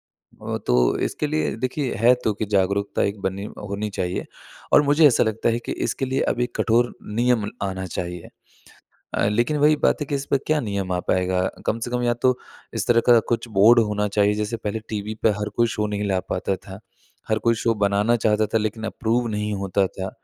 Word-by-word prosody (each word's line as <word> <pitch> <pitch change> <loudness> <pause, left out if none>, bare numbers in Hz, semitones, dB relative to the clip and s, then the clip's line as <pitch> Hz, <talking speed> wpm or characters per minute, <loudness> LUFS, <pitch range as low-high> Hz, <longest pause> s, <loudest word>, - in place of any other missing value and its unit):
अ, - - -7
तो - - +3
इसके 150 - -3
लिए 155 +1 0
देखिए 130 +1 -2
है 120 +2 +6
तो 110 - +2
की 110 - 0
जागरूकता 100 +1 0
एक 100 +1 -1
बनी 95 +1 -6 0.3
होनी 105 +1 -3
चाहिए 90 0 -2 0.5
और - - +7
मुझे 150 +2 +6
ऐसा 125 - +3
लगता 110 +1 -1
है 115 - 0
कि - - -2 0.2
इसके - - -2
लिए 130 +1 -1
अभी 120 0 0
कठोर 120 +1 +2 0.3
नियम 120 -4 +2
आना 95 -1 -3
चाहिए। 90 -1 -5 0.9
अ, - - +1
लेकिन 120 +8 +1
वही 150 +1 +4
बात - - +1
है - - -4
कि 145 - -3
इस 140 0 -5
पर 140 - +3
क्या 155 -1 +2
नियम 100 -5 -3
आ 90 - 0
पाएगा? 90 0 +1 0.2
कम 115 - 0
से 120 - -4
कम 125 0 0
या 120 0 +2
तो 125 +1 +1 0.4
इस - - -2
तरह 120 -1 +5
का 120 -1 +8
कुछ 120 +1 -1
बोर्ड 115 +4 +7
होना 105 0 -1
चाहिए। 105 0 +2
जैसे 105 +2 -2
पहले 110 0 -4
टीवी 105 0 -4
पर 110 - +6
हर 105 - -2
कोई 120 - +4
शो 105 - 0
नहीं 105 0 -2
ला 95 -1 +1
पाता 95 - -1
था, 95 0 -11 0.5
हर 110 -1 +1
कोई 115 +1 +2
शो 115 - +3
बनाना 105 +4 +2
चाहता 110 -1 +2
था - - +5
लेकिन 110 +1 -3
अप्रूव 120 +2 -1
नहीं 105 -1 -2
होता 95 +1 +1
था। 95 0 -6
110 Hz, 215 wpm, -23 LUFS, 100-120 Hz, 0.9 s, का